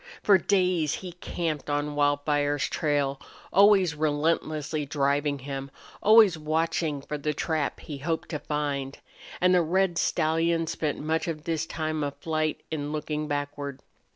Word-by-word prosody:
For 200 -2 +6
days 180 -6 +1
he 185 -2 -7
camped 165 -3 -4
on 145 0 -1
Wildfire's 145 0 +1
trail, 145 -3 0 0.3
always 195 -4 +6
relentlessly 155 0 0
driving 145 0 0
him, 135 0 -6 0.3
always 215 -6 +6
watching 155 -1 -1
for 150 +1 -5
the 150 +1 -2
trap 155 -1 -1
he 145 -3 -7
hoped 160 +3 -2
to 150 - -3
find. 145 -3 -3 0.4
And 180 0 +4
the 180 - +5
red 175 +1 +1
stallion 165 +1 +1
spent 155 -2 -2
much 160 +2 -1
of 155 -2 -4
this 165 -1 -2
time 155 -1 -2
of 140 -1 -3
flight 155 -1 -2
in 145 -2 -3
looking 150 0 -3
backward. 145 -1 -4
155 Hz, 145 wpm, -27 LUFS, 145-165 Hz, 0.4 s, For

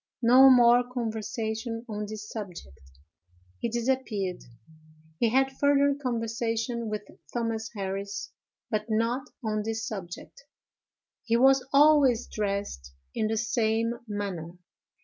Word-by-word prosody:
No 255 +3 +8
more 245 -1 +7
conversation 225 0 -3
on 210 -1 -4
this 215 -1 -7
subject. 180 - -8 0.8
He 235 - -1
disappeared. 230 -6 -2 0.8
He 235 - +3
had 265 +3 +2
further 285 +1 +3
conversation 230 -1 -2
with 210 -1 -3 0.3
Thomas 230 -2 -2
Harris, 200 0 -4 0.4
but 215 0 0
not 230 +5 0 0.2
on 215 -1 -1
this 225 +1 -3
subject. 190 +3 -8 0.8
He 230 0 +2
was 265 +1 +5
always 280 -4 +5
dressed 200 - -4 0.2
in 215 - 0
the 220 +1 -1
same 225 +1 0
manner. 195 -5 -4
225 Hz, 110 wpm, -27 LUFS, 210-245 Hz, 0.8 s, No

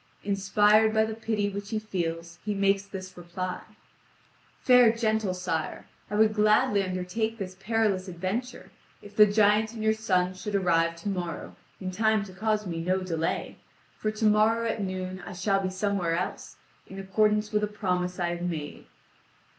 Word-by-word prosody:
Inspired 210 +2 +3
by 220 0 +4
the 220 - -4
pity 220 -2 -1
which 200 0 -5
he 220 - -1
feels, 170 -5 -4
he 210 -1 -2
makes 195 0 +2
this 190 -1 -8
reply: 180 +1 -5 1.0
"Fair 250 -3 +7
gentle 220 -4 0
sire, 180 -4 -3 0.2
I 210 - -3
would 215 0 +4
gladly 210 -1 +3
undertake 190 +4 -2
this 185 -3 -6
perilous 205 -2 0
adventure, 190 +8 -4 0.3
if 205 0 -13
the 210 0 +8
giant 210 +1 +3
and 220 -2 -5
your 220 0 +3
sons 185 -4 0
should 210 -1 -3
arrive 170 -3 +2
to 205 - -2
morrow 175 -3 -4 0.2
in 185 -1 -4
time 220 +2 +2
to 190 -2 -10
cause 215 +2 -1
me 165 -3 -3
no 185 +2 0
delay, 165 -3 -2 0.4
for 215 - -2
tomorrow 215 +1 +2
at 225 -1 -2
noon 185 -1 -4
I 185 - -8
shall 195 +2 +1
be 190 - -1
somewhere 185 -3 -1
else, 180 - -4 0.3
in 195 - -10
accordance 210 +2 +1
with 210 -1 +1
a - - +2
promise 180 -3 -2
I 175 -1 0
have 175 0 -4
made." 160 -4 -5
200 Hz, 170 wpm, -27 LUFS, 185-215 Hz, 1.0 s, the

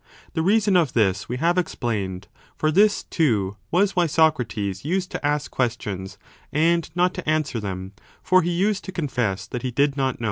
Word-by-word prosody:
The 160 - 0
reason 200 +2 +3
of 165 -7 +3
this 100 -4 +1
we 125 - -2
have 170 +5 +2
explained; 100 - -3
a - - -34 0.2
for 155 - +1
this, 205 +5 +4
too, 105 - 0
was 190 +3 +2
why 175 -2 +3
Socrates 115 - +1
used 180 +5 -1
to - - -5
ask 145 0 0
questions 100 -6 -3 0.3
and 165 +3 +2
not 180 +1 +2
to 180 -4 -4
answer 155 -6 0
them; 95 -2 -5 0.3
for 185 0 +4
he 175 - -1
used 195 +4 0
to 190 - -5
confess 125 - -2
that 125 - -5
he 130 - -2
did 140 +3 +1
not 135 -2 0
know. - - -30
145 Hz, 190 wpm, -23 LUFS, 110-175 Hz, 0.3 s, this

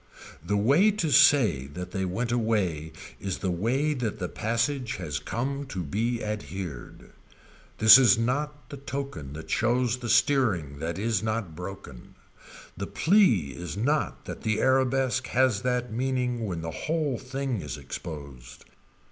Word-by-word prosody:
The 105 +5 0
way 140 - +4
to 195 -7 -1
say 120 - +5
that 90 +5 -7
they 95 -1 -2
went 115 +7 -2
away 100 -10 0 0.3
is 95 -2 -3
the 95 - -2
way 125 - 0
that 120 -6 -3
the 90 -4 -3
passage 120 +3 -1
has 75 -6 -4
come 140 +4 -3
to 95 -6 -4
be 115 +10 -2
adhered. 90 - -6 0.7
This 110 +4 +9
is 125 -2 +5
not 145 +6 -2
the 140 - -6
token 135 - -6
that 80 +2 -8
shows 120 +1 +1
the 120 -2 -6
steering 100 - +2
that 85 +2 -3
is 110 +3 0
not 110 -6 -3
broken. 90 -8 -9 0.6
The - - -5
plea 155 - +3
is 90 +2 -6
not 145 +8 -1
that - - -7
the 110 -2 0
arabesque 130 -1 +2
has 125 -5 +2
that 125 -2 -1
meaning 125 -2 -1
when 85 -4 -4
the 80 0 -4
whole 150 - -2
thing 130 -4 -3
is 75 -4 -6
exposed. 70 -6 -9
115 Hz, 150 wpm, -27 LUFS, 90-130 Hz, 0.7 s, This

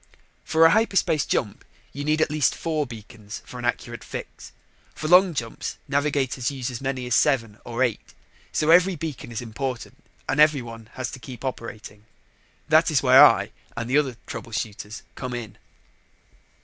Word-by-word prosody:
For 160 +1 +4
a 165 - +7
hyperspace 190 -8 +2
jump, 105 -5 -1 0.3
you 145 - -5
need 155 +1 +1
at 155 - +2
least 150 -1 +2
four 155 -3 -2
beacons 110 -2 -10
for 125 - -9
an 120 - -5
accurate 120 -2 -3
fix. - - -8 0.4
For 155 - -4
long 180 0 +6
jumps, 115 -4 -4
navigators 140 -2 0
use 130 -3 -4
as 125 - -6
many 135 -2 -3
as 125 - -2
seven 115 -6 +2
or 120 +2 -1
eight. 120 -5 -3 0.4
So 155 +1 +2
every 180 +2 +5
beacon 150 -6 -6
is 115 +1 -4
important 120 +1 -5 0.2
and 135 - 0
every 150 -4 +5
one 115 -1 -10
has 130 -1 -4
to 130 - -8
keep 125 0 -9
operating. 110 -4 -7 0.6
That - - +5
is - - +2
where - - +9
I - - +5 0.3
and 115 -1 -3
the 135 +4 +4
other 130 -5 -2
trouble 115 0 -8
shooters 105 0 -5
came 125 -2 -5
in. 115 -3 -7
130 Hz, 175 wpm, -24 LUFS, 115-150 Hz, 0.6 s, where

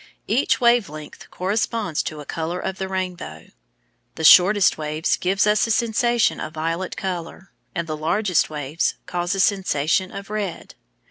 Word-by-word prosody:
Each 245 +7 +1
wave 235 -3 +3
length 155 0 -11
corresponds 205 -2 -1
to 155 -1 -6
a - - -11
colour 165 +4 -4
of 190 - -4
the 190 - -2
rainbow. 185 -2 -5 0.7
The 160 - -6
shortest 185 +5 +7
waves 155 +1 -1
give 190 +3 +1
us 210 -1 +3
a - - -6
sensation 230 0 +1
of 155 - -6
violet 165 +4 -3
colour, 185 0 -5 0.2
and 170 -2 -2
the 155 -1 -4
largest 175 +4 +1
waves 150 +1 -2
cause 175 +2 -2
a - - -3
sensation 185 -2 +1
of 200 +1 -8
red. 205 -5 -4
185 Hz, 155 wpm, -22 LUFS, 160-205 Hz, 0.7 s, shortest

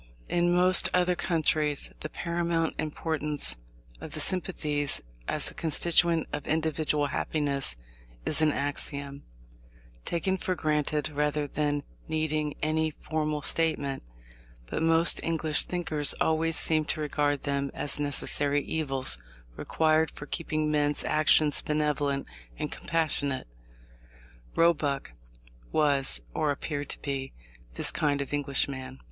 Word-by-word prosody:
In 175 0 +2
most 180 +1 +4
other 180 0 +3
countries 155 -4 0
the 155 - -5
paramount 170 -1 -1
importance 150 - -2 0.4
of - - -9
the - - -3
sympathies 150 -6 0 0.3
as - - 0
a - - -15
constituent 165 +1 +2
of 150 -1 -4
individual 155 -2 +1
happiness 140 - -1 0.5
is 155 - +2
an 155 -1 +4
axiom, 140 0 -3 0.8
taken 190 +3 -1
for 185 -2 -2
granted 150 -2 0
rather 150 0 0
than 145 0 -1 0.2
needing 155 -1 -1
any 155 +1 +1
formal 155 -1 -3
statement; 145 -4 0 0.6
but - - -4
most 165 +1 +5
English 160 -2 +2
thinkers 155 -5 +2
always 160 0 +1
seem 155 -1 +3
to 155 - -1
regard 145 -1 0
them 140 -1 -1
as 140 0 0
necessary 145 0 +3
evils, 135 - +1 0.4
required 160 - +2
for 145 - -10
keeping 155 -1 -2
men's 145 -1 +1
actions 155 -1 +3
benevolent 150 -2 0 0.3
and - - -4
compassionate. 145 - +1 1.1
Roebuck 150 - +1 0.6
was, 140 - +2
or 150 - 0
appeared 145 0 -3
to - - -5
be, 135 -2 -3 0.4
this - - +2
kind 145 -2 0
of 140 +1 -4
Englishman. 135 -2 -1
150 Hz, 120 wpm, -28 LUFS, 145-160 Hz, 1.1 s, most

